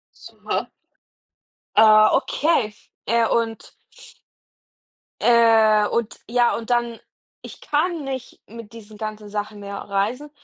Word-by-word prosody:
Super. -, -, -5 dB, 1.1 s
Ah, 215 Hz, -1 st, +7 dB
okay, 265 Hz, -4 st, +1 dB, 0.3 s
äh, 230 Hz, +1 st, +2 dB
und 225 Hz, -2 st, -2 dB, 1.5 s
äh, 225 Hz, -3 st, +4 dB
und 235 Hz, -2 st, -3 dB
ja 240 Hz, 0 st, +2 dB
und 230 Hz, +1 st, -8 dB
dann, 235 Hz, -1 st, 0 dB, 0.4 s
ich -, -, -11 dB
kann 315 Hz, +1 st, -1 dB
nicht 260 Hz, -2 st, -7 dB
mit 230 Hz, -1 st, -11 dB
diesen 215 Hz, -2 st, -13 dB
ganzen 215 Hz, -1 st, -6 dB
Sachen 205 Hz, 0 st, -5 dB
mehr 200 Hz, 0 st, -7 dB
reisen 220 Hz, +10 st, -3 dB
230 Hz, 110 wpm, -22 LUFS, 215-240 Hz, 1.5 s, Ah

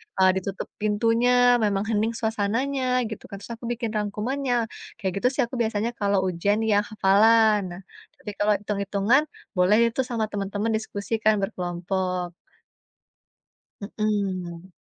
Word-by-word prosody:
eee, 190 Hz, -1 st, +5 dB
ditutup 195 Hz, +1 st, -5 dB
pintunya, 235 Hz, +4 st, +3 dB
memang 205 Hz, -3 st, +1 dB
hening 220 Hz, +1 st, +1 dB
suasananya, 250 Hz, +4 st, 0 dB
gitu, 220 Hz, -, -8 dB
kan. -, -, -8 dB
Terus -, -, -9 dB
aku 235 Hz, -, -9 dB
bikin 235 Hz, -1 st, -3 dB
rangkumannya, 240 Hz, +6 st, -2 dB, 0.4 s
kayak 190 Hz, -2 st, -3 dB
gitu 245 Hz, -, +2 dB
sih -, -, +2 dB
aku 240 Hz, +2 st, -5 dB
biasanya 225 Hz, 0 st, 0 dB
kalau 200 Hz, -1 st, +2 dB
ujian 195 Hz, +4 st, 0 dB
yang 205 Hz, 0 st, +3 dB
hafalan. 215 Hz, +2 st, +5 dB
Nah, 190 Hz, -4 st, -2 dB, 0.4 s
tapi 210 Hz, -, -6 dB
kalau 210 Hz, 0 st, +3 dB
hitung-hitungan 205 Hz, +6 st, +1 dB, 0.3 s
boleh 180 Hz, +4 st, +4 dB
itu 230 Hz, -, -1 dB
sama 230 Hz, -3 st, 0 dB
teman-teman 205 Hz, +2 st, -2 dB
diskusi 210 Hz, 0 st, -6 dB
kan, 215 Hz, 0 st, +5 dB
berkelompok. 180 Hz, -2 st, -3 dB, 1.6 s
Mhm. 190 Hz, -4 st, -2 dB
210 Hz, 135 wpm, -25 LUFS, 195-230 Hz, 1.6 s, eee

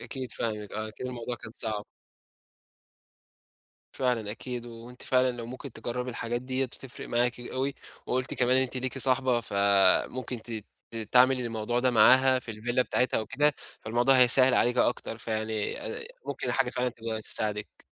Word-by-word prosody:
أكيد 130 Hz, -4 st, -6 dB
فاهمِك، 105 Hz, -3 st, -3 dB
آه، 110 Hz, 0 st, -4 dB
أكيد 110 Hz, +4 st, -7 dB
الموضوع 120 Hz, -1 st, -5 dB
كان 115 Hz, -, -10 dB
صعب. 105 Hz, -2 st, -4 dB, 2.1 s
فعلًا 120 Hz, -5 st, -1 dB
أكيد، 125 Hz, +1 st, -6 dB
وأنتِ 120 Hz, +1 st, -11 dB
فعلًا 130 Hz, 0 st, +2 dB
لو 120 Hz, -2 st, -7 dB
ممكن 130 Hz, +1 st, -8 dB
تجربي 125 Hz, +3 st, -4 dB
الحاجات 120 Hz, 0 st, -3 dB
ديّة 130 Hz, +1 st, -1 dB
هتفرِق 130 Hz, 0 st, -9 dB
معاكِ 120 Hz, 0 st, 0 dB
أوي. 130 Hz, +3 st, -3 dB, 0.3 s
وقُلتِ 130 Hz, 0 st, -1 dB
كمان 125 Hz, +1 st, +3 dB
إن 130 Hz, -, +4 dB
أنتِ 130 Hz, 0 st, -3 dB
ليكِ 130 Hz, -1 st, -3 dB
صاحبة، 130 Hz, -2 st, +3 dB
فممكن 100 Hz, +4 st, +2 dB
ت 110 Hz, -3 st, -6 dB, 0.3 s
ت 115 Hz, -, -7 dB
تعمل 125 Hz, +4 st, +4 dB
الموضوع 115 Hz, 0 st, -2 dB
ده 130 Hz, 0 st, +3 dB
معاها 130 Hz, +3 st, +6 dB
في 115 Hz, -3 st, -7 dB
الvilla 120 Hz, +4 st, -1 dB
بتاعتها 125 Hz, -1 st, +1 dB
أو 110 Hz, -, -4 dB
كده، 150 Hz, +1 st, +2 dB, 0.3 s
فالموضوع 120 Hz, +4 st, +3 dB
هيسهّل 130 Hz, +1 st, +7 dB
عليكِ 125 Hz, +1 st, +2 dB
أكتر، 120 Hz, -2 st, 0 dB
فيعني 110 Hz, -2 st, -3 dB
آآ، 460 Hz, 0 st, -6 dB, 0.2 s
ممكن -, -, -3 dB
حاجة 135 Hz, -2 st, +1 dB
فعلًا 125 Hz, 0 st, -1 dB
تبقى 115 Hz, -2 st, -5 dB
تساعدِك. 105 Hz, -1 st, -2 dB
120 Hz, 160 wpm, -28 LUFS, 110-130 Hz, 2.1 s, هيسهّل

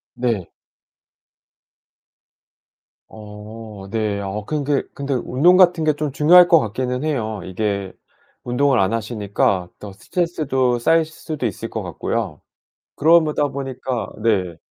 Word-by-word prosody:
네. 115 Hz, -7 st, -2 dB, 2.6 s
어 105 Hz, -1 st, -10 dB
네. 105 Hz, -3 st, -1 dB
어 100 Hz, +2 st, -4 dB
근데 145 Hz, -1 st, -1 dB
근데 140 Hz, -1 st, -3 dB
운동 145 Hz, +9 st, +3 dB
같은 175 Hz, -3 st, +4 dB
게 155 Hz, -, +3 dB
좀 150 Hz, -2 st, -3 dB
중요할 175 Hz, +5 st, +6 dB
것 165 Hz, -2 st, +6 dB
같기는 125 Hz, +4 st, -3 dB
해요. 110 Hz, -, -2 dB
이게 100 Hz, 0 st, -3 dB, 0.5 s
운동을 125 Hz, +1 st, +2 dB
안 95 Hz, +3 st, +1 dB
하시니까 100 Hz, -5 st, -1 dB
더 100 Hz, -2 st, -9 dB
스트레스도 135 Hz, -, -1 dB
쌓일 165 Hz, +7 st, +3 dB
수도 155 Hz, -4 st, -5 dB
있을 110 Hz, +2 st, -5 dB
것 110 Hz, -, -4 dB
같고요. 90 Hz, 0 st, -3 dB, 0.5 s
그러다 155 Hz, -2 st, +3 dB
보니까 130 Hz, -5 st, -4 dB
네. 95 Hz, -7 st, +1 dB
120 Hz, 230 characters per minute, -20 LUFS, 105-145 Hz, 2.6 s, 중요할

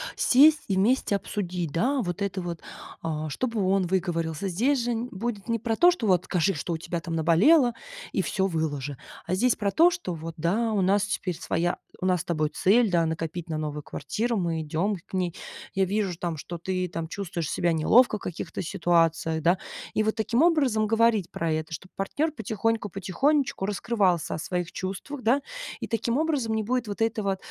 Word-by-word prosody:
сесть 300 Hz, +4 st, +5 dB
и 195 Hz, -, 0 dB
вместе 210 Hz, +2 st, +2 dB
обсудить, 180 Hz, -5 st, -3 dB
да, 255 Hz, -, +1 dB
вот 180 Hz, +2 st, -4 dB
это 200 Hz, -1 st, -1 dB
вот, 170 Hz, -2 st, -5 dB, 0.4 s
а, 155 Hz, -1 st, -3 dB
чтобы 225 Hz, -, -1 dB
он 190 Hz, -2 st, +2 dB
выговорился. 170 Hz, -1 st, -1 dB
Здесь 240 Hz, +8 st, +1 dB
же 240 Hz, -, -1 dB, 0.2 s
будет 210 Hz, +1 st, -4 dB
не 230 Hz, -, +2 dB
про 225 Hz, 0 st, -1 dB
то, 350 Hz, +9 st, +6 dB
что 350 Hz, -11 st, -1 dB
вот: 185 Hz, -2 st, +3 dB
"Скажи, 185 Hz, +1 st, +1 dB
что 170 Hz, +1 st, -3 dB
у -, -, -1 dB
тебя 170 Hz, +1 st, -4 dB
там 165 Hz, -1 st, -4 dB
наболело 225 Hz, -, +5 dB, 0.4 s
и -, -, +1 dB
всё 190 Hz, -1 st, 0 dB
выложи". 145 Hz, -5 st, -2 dB, 0.3 s
А 180 Hz, -, -2 dB
здесь 245 Hz, +5 st, +3 dB
про 200 Hz, -2 st, -1 dB
то, 335 Hz, +2 st, +6 dB
что: 345 Hz, -, -4 dB
"Вот 165 Hz, 0 st, -7 dB
да, 210 Hz, +8 st, +1 dB
у 200 Hz, -, +2 dB
нас 195 Hz, +2 st, +3 dB
теперь 185 Hz, -4 st, -2 dB
своя 170 Hz, +2 st, -1 dB, 0.2 s
у 185 Hz, -, -1 dB
нас 180 Hz, -3 st, +2 dB
с -, -, -7 dB
тобой 155 Hz, -3 st, 0 dB
цель, 215 Hz, +8 st, +3 dB
да, 170 Hz, -2 st, +3 dB
накопить 165 Hz, +1 st, -4 dB
на 155 Hz, -, -2 dB
новую 150 Hz, -1 st, -4 dB
квартиру. 230 Hz, +1 st, -2 dB
Мы 165 Hz, -3 st, -1 dB
идем 170 Hz, +7 st, -1 dB
к -, -, -25 dB
ней. 180 Hz, -2 st, -1 dB, 0.4 s
Я 190 Hz, -, +2 dB
вижу 195 Hz, 0 st, 0 dB
ж 165 Hz, -, -10 dB
там, 170 Hz, -3 st, -3 dB
что 175 Hz, +4 st, -6 dB
ты 185 Hz, +1 st, -2 dB
там 165 Hz, -1 st, -5 dB
чувствуешь 175 Hz, -5 st, -4 dB
себя 170 Hz, -1 st, +1 dB
неловко 215 Hz, +8 st, +4 dB
в -, -, -18 dB
каких-то 175 Hz, -, -5 dB
ситуациях". 165 Hz, -3 st, +1 dB
Да, 175 Hz, +4 st, +3 dB, 0.4 s
и 215 Hz, -, +3 dB
вот 220 Hz, 0 st, +1 dB
таким 230 Hz, +6 st, +2 dB
образом 270 Hz, -11 st, +3 dB
говорить 225 Hz, -3 st, +2 dB
про 165 Hz, -1 st, -1 dB
это, 155 Hz, +1 st, -2 dB
чтоб 185 Hz, +4 st, -8 dB
партнёр 295 Hz, +11 st, -1 dB
потихоньку, 225 Hz, -3 st, -1 dB
потихонечку 240 Hz, -, 0 dB
раскрывался 195 Hz, -5 st, 0 dB
о -, -, -4 dB
своих 180 Hz, +1 st, -3 dB
чувствах, 200 Hz, +9 st, -5 dB
да. 255 Hz, +6 st, +3 dB, 0.4 s
И -, -, -4 dB
таким 230 Hz, +2 st, 0 dB
образом 290 Hz, -8 st, 0 dB
не 220 Hz, 0 st, 0 dB
будет 245 Hz, +1 st, -1 dB
вот 205 Hz, +2 st, -5 dB
этого 215 Hz, -4 st, 0 dB
190 Hz, 200 wpm, -26 LUFS, 170-225 Hz, 0.4 s, то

